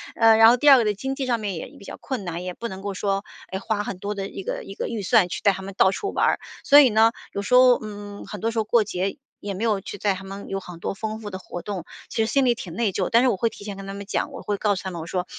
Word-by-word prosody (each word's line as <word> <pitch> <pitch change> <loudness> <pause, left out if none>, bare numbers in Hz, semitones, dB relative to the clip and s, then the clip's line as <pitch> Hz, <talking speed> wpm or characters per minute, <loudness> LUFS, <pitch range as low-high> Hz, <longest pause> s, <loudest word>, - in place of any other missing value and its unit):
呃， 225 -1 +6
然 225 0 +8
后 245 - +6
第 290 +4 +4
二 275 - +10
个 235 - +2
的 210 - +2
经 265 +7 -4
济 270 - -3
上 240 -2 0
面 200 -4 -3
也 160 - -5
比 - - -14
较 - - -8
困 255 -7 -4
难， 175 0 -4
也 180 - -4
不 235 +5 -6
能 190 -1 -8
够 200 -1 -4
说， 195 +1 -1 0.2
哎， 190 - -3
花 210 0 -1
很 195 - -5
多 205 +2 -4
的 195 0 -4
一 195 - -7
个 - - -4
一 195 - -9
个 - - -3
预 225 -3 -4
算， 200 -1 +4
去 - - -4
带 200 - +5
他 190 0 -6
们 195 0 -7
到 190 - +5
处 400 - -3
玩 - - +2
儿。 - - +1 0.2
所 290 0 +8
以 270 - +7
呢， 220 +1 +5 0.2
有 200 - -2
时 205 - -3
候， 250 -1 +7
嗯， 205 -1 -8
很 210 - -7
多 225 +4 0
时 230 - -6
候 - - +2
过 215 0 +3
节 190 +10 -2 0.2
也 200 -1 -4
没 195 +4 -4
有 210 -3 +2
去 205 - -7
带 200 +1 +1
他 185 - -9
们 195 +1 -8
有 195 - -2
很 180 -3 -11
多 - - -2
丰 220 +1 -5
富 210 - -6
的 190 - -6
活 175 -2 -7
动， 190 -3 -5 0.2
其 - - -7
实 220 - -3
心 275 -1 +3
里 240 -1 +3
挺 175 -7 -8
内 215 0 0
疚。 185 0 -1
但 235 +2 +5
是 255 - +4
我 200 - 0
会 230 +4 +1
提 - - -13
前 200 -1 -6
跟 195 0 -8
他 195 - -5
们 200 0 -7
讲， 290 +8 -2
我 270 - -7
会 205 -1 -2
告 205 0 +1
诉 185 - -6
他 190 - -4
们 170 - -6
我 160 - -8
说： 180 +1 -2
205 Hz, 365 characters per minute, -24 LUFS, 195-230 Hz, 0.2 s, 二